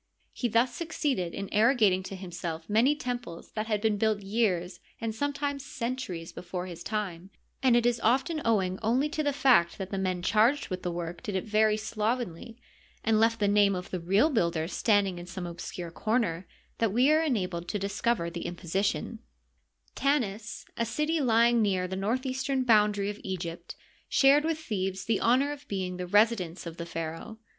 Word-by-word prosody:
He 245 - -1
thus 235 +2 +2
succeeded 270 - -2
in 200 - -4
arrogating 215 -4 +4
to 195 - -6
himself 170 -3 -6
many 235 +8 +3
temples 245 - -5
that 215 0 -3
had 210 -2 0
been 215 -1 +1
built 215 -1 +1
years, 190 -4 0 0.2
and 225 -1 -2
sometimes 285 +2 -2
centuries, 235 -11 -4
before 180 0 -5
his 175 -2 -8
time; 185 -1 -4 0.3
and 255 -3 +4
it 240 - +2
is 240 -1 +2
often 265 +8 +1
owing 190 -5 +1
only 250 +7 +1
to 310 0 -2
the 290 -1 +1
fact 255 -11 +3
that 190 -1 -6
the 195 - -2
men 185 -2 -1
charged 225 +9 +3
with 185 -1 -4
the 180 - -2
work 170 0 -5
did 205 - -4
it 190 - 0
very 215 0 +2
slovenly, 220 -1 -3 0.5
and 220 -1 +3
left 225 +1 +3
the 205 - +2
name 200 -1 +4
of 180 0 -6
the 185 - -2
real 195 - +3
builder 170 - +1
standing 200 -2 +1
in 175 - -9
some 185 0 -6
obscure 170 0 -6
comer, 205 -4 -1 0.3
that 225 -3 +2
we 250 +7 +4
are 310 +1 +4
enabled 185 - -1
to 210 - -2
discover 200 -1 -1
the 170 0 -5
imposition, 195 +6 -2 0.7
Tanis, 230 -7 -1
a 230 - 0
city 300 +8 0
lying 235 -1 +4
near 190 -3 +1
the 190 - -4
northeastern 260 +6 -1
boundary 210 -3 +3
of 210 - -10
Eg^pt, 175 -3 -5 0.3
shared 285 +2 +5
with 325 -1 0
Thebes 195 -10 -3
the 225 -3 +1
honor 260 +5 +3
of 290 0 -9
being 185 -2 -3
the 180 0 -4
resi 215 +5 +4
dence 175 -2 -6
of 165 0 -7
the 170 - -6
pharaoh. 165 +7 -5
210 Hz, 185 wpm, -28 LUFS, 180-240 Hz, 0.7 s, shared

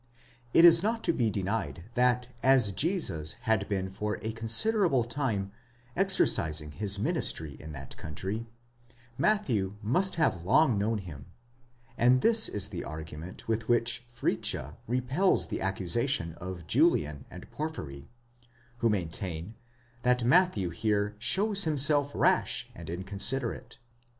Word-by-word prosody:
It 165 - +7
is 170 -1 +8
not 225 +3 -1
to - - +1
be 115 -6 +1
denied, 100 -3 -3
that 125 0 +1
as 130 -5 +4
Jesus 95 - 0
had 110 -5 0
been 95 -2 -2
for 105 +2 -3
a 110 - -2
considerable 125 - +3
time 115 -6 -2 0.4
exercising 80 - +2
his 100 +4 +1
ministry 100 - 0
in 80 - -9
that 70 -2 -9
country, 95 +9 -5 0.7
Matthew 115 - +1
must 180 - +1
have 155 - 0
long 125 - +4
known 110 +2 0
him; 80 -9 -9 0.7
and 125 +2 +4
this 225 -1 +4
is 100 -1 -3
the 90 -5 -5
argument 80 +2 -8
with 115 +1 -2
which 120 0 +1
Fritzsche 75 - -2
repels 130 - +1
the - - -4
accusation 95 - -1
of 90 -2 -7
Julian 80 - +1
and - - -11
Porphyry, 75 - -6 0.7
who 115 - +2
maintain 90 -1 -4 0.5
that 125 0 +2
Matthew 125 - +3
here 105 +3 -1
shows 200 - +2
himself 145 -1 +2
rash - - +1
and 85 -1 -11
incon 95 +4 -6
siderate. 125 0 -2
110 Hz, 130 wpm, -29 LUFS, 95-135 Hz, 0.7 s, is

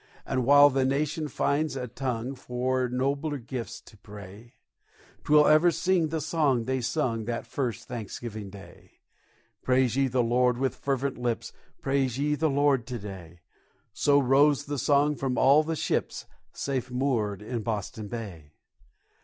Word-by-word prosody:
And 130 -2 -1
while 145 0 +7
the 135 0 +1
nation 150 +4 -1
finds 145 +2 0
a 125 -2 -4
tongue 125 0 -3
For 125 0 -2
nobler 140 +4 -1
gifts 120 -1 -6
to 110 - -17
pray, 105 +3 -12 0.7
'Twill 150 0 +5
ever 155 +3 +5
sing 170 +1 +1
the 160 +1 -2
song 145 -5 +1
they 130 +2 -1
sung 120 -4 -1
That 115 0 -3
first 120 -5 -4
Thanksgiving 110 -2 -6
Day: 95 -3 -14 0.7
"Praise 130 -2 +2
ye 135 0 +2
the 125 -1 +1
Lord 125 +1 +2
with 135 +1 0
fervent 135 -1 -2
lips, 120 -2 -3 0.3
Praise 135 -2 0
ye 150 +2 0
the 155 +1 +1
Lord 140 -4 +2
to 125 - -4
day;" 95 -5 -10 0.5
So 145 -1 +3
rose 140 +1 +3
the 145 -1 -3
song 145 +3 +2
from 130 -2 -2
all 140 +5 +6
the 160 +1 -3
ships, - - -2 0.3
Safe 130 -2 -3
moored 120 -6 -1
in 115 +1 -4
Boston 105 -1 -4
Bay. 95 -10 -8
130 Hz, 155 wpm, -27 LUFS, 115-145 Hz, 0.7 s, while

